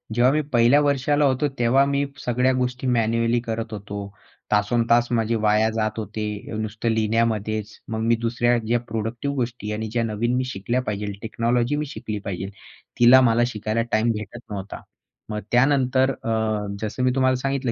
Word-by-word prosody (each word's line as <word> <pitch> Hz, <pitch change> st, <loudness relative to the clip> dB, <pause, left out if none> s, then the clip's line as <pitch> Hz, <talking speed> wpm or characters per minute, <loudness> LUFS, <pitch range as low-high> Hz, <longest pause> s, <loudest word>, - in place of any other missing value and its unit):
जेव्हा 125 Hz, +2 st, +4 dB
मी 155 Hz, -, +2 dB
पहिल्या 120 Hz, +4 st, +5 dB
वर्षाला 145 Hz, +1 st, +2 dB
होतो, 135 Hz, +2 st, +2 dB
तेव्हा 130 Hz, +4 st, +4 dB
मी 140 Hz, 0 st, 0 dB, 0.2 s
सगळ्या 125 Hz, +2 st, +2 dB
गोष्टी 125 Hz, 0 st, -2 dB
मॅन्युअली 115 Hz, 0 st, +2 dB
करत 115 Hz, -1 st, -4 dB
होतो. 100 Hz, 0 st, -6 dB, 0.4 s
तासंतास 115 Hz, +3 st, +3 dB
माझे 115 Hz, -1 st, +1 dB
वाया 110 Hz, 0 st, +3 dB
जात 110 Hz, 0 st, -2 dB
होते. 110 Hz, 0 st, -4 dB, 0.3 s
नुसतं 110 Hz, +1 st, -2 dB
लिहिण्यामध्येच. 110 Hz, -1 st, 0 dB
मग 110 Hz, -, -2 dB
मी 115 Hz, -, +4 dB
दुसऱ्या 120 Hz, +1 st, +2 dB
ज्या 120 Hz, +1 st, +2 dB
प्रोडक्टिव्ह 115 Hz, +6 st, -3 dB
गोष्टी 120 Hz, -4 st, -3 dB
आणि 110 Hz, +1 st, -3 dB
ज्या 120 Hz, 0 st, 0 dB
नवीन 115 Hz, +2 st, -1 dB
मी 130 Hz, -, +1 dB
शिकल्या 120 Hz, +1 st, -2 dB
पाहिजेल, 105 Hz, -3 st, -3 dB
टेक्नॉलॉजी 120 Hz, +4 st, 0 dB
मी 150 Hz, +1 st, -2 dB
शिकली 110 Hz, -7 st, -5 dB
पाहिजेल, 95 Hz, 0 st, -4 dB, 0.5 s
तिला 125 Hz, +2 st, +8 dB
मला 120 Hz, -1 st, +3 dB
शिकायला 110 Hz, 0 st, -2 dB
टाईम 110 Hz, +2 st, +2 dB
भेटत 105 Hz, +2 st, -6 dB
नव्हता. 100 Hz, -1 st, -6 dB, 0.5 s
मग 105 Hz, -1 st, -3 dB
त्यानंतर 130 Hz, +1 st, +3 dB
अ, 115 Hz, -, -6 dB, 0.5 s
जसं 110 Hz, +4 st, -3 dB
मी 125 Hz, -, +3 dB
तुम्हाला 130 Hz, -1 st, +3 dB
सांगितलं 135 Hz, -1 st, -1 dB
115 Hz, 165 wpm, -23 LUFS, 110-125 Hz, 0.5 s, तिला